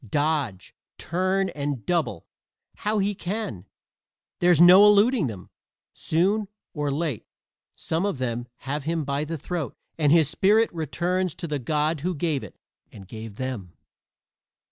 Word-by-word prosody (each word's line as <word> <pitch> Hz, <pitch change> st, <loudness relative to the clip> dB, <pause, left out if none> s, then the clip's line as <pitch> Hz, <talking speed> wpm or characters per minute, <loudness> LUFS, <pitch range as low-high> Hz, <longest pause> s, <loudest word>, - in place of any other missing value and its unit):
Dodge, 145 Hz, -8 st, -1 dB, 0.2 s
turn 185 Hz, +3 st, 0 dB
and 140 Hz, -5 st, -4 dB
double 165 Hz, -, -1 dB, 0.5 s
how 210 Hz, +1 st, -1 dB
he 205 Hz, 0 st, +1 dB
can, 180 Hz, -, -5 dB, 0.7 s
there's 175 Hz, -3 st, +4 dB
no 180 Hz, +3 st, +9 dB
eluding 210 Hz, -, +4 dB
them; 100 Hz, -6 st, -8 dB, 0.4 s
soon 195 Hz, +6 st, +1 dB, 0.3 s
or 150 Hz, -2 st, -2 dB
late 145 Hz, -4 st, -2 dB, 0.5 s
some 165 Hz, +2 st, -2 dB
of 200 Hz, -7 st, -1 dB
them 120 Hz, -1 st, -3 dB
have 140 Hz, +1 st, -4 dB
him 165 Hz, 0 st, -1 dB
by 140 Hz, +2 st, -1 dB
the 165 Hz, +1 st, -4 dB
throat 160 Hz, 0 st, -4 dB, 0.2 s
and 145 Hz, -2 st, +3 dB
his 160 Hz, -3 st, +5 dB
spirit 215 Hz, +7 st, +3 dB
returns 175 Hz, +2 st, -1 dB
to -, -, -5 dB
the 150 Hz, -2 st, -2 dB
God 150 Hz, +4 st, 0 dB
who 180 Hz, +2 st, -1 dB
gave 150 Hz, -2 st, -1 dB
it -, -, -11 dB, 0.3 s
and 100 Hz, -3 st, -12 dB
gave 110 Hz, 0 st, -8 dB
them. 115 Hz, -8 st, -5 dB
160 Hz, 145 wpm, -25 LUFS, 135-185 Hz, 0.7 s, no